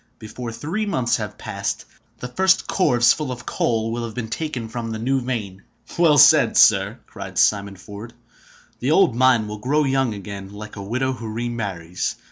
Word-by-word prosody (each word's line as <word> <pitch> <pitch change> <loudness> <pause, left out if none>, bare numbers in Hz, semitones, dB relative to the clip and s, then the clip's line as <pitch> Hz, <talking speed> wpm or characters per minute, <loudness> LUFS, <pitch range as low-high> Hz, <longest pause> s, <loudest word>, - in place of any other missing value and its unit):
Before 115 +2 -7
three 180 - -3
months 130 -11 +1
have - - -6
passed, - - -4 0.3
the 125 - -6
first 190 +8 +2
corves 120 -11 +3
full 150 -4 -4
of 125 - -7
coal 115 -1 -1
will 120 +1 -3
have 115 -2 -6
been 120 -3 -4
taken 130 -4 -3
from 115 0 -5
the 110 - -4
new 130 +4 0
vein." 105 -7 -4 0.3
"Well 165 -4 +4
said, - - +6
sir!" 100 +4 +5
cried 100 -3 -9
Simon 100 -1 +2
Ford. 105 +5 -10 0.6
"The 125 - -1
old 155 -6 +4
mine 125 -3 +3
will 105 0 -6
grow 145 +7 +1
young 135 -5 0
again, 100 -1 -8
like 105 +1 -9
a 100 - -7
widow 130 +6 -1
who 115 -2 -7
remarries! 105 -7 -3
115 Hz, 180 wpm, -22 LUFS, 105-130 Hz, 0.6 s, said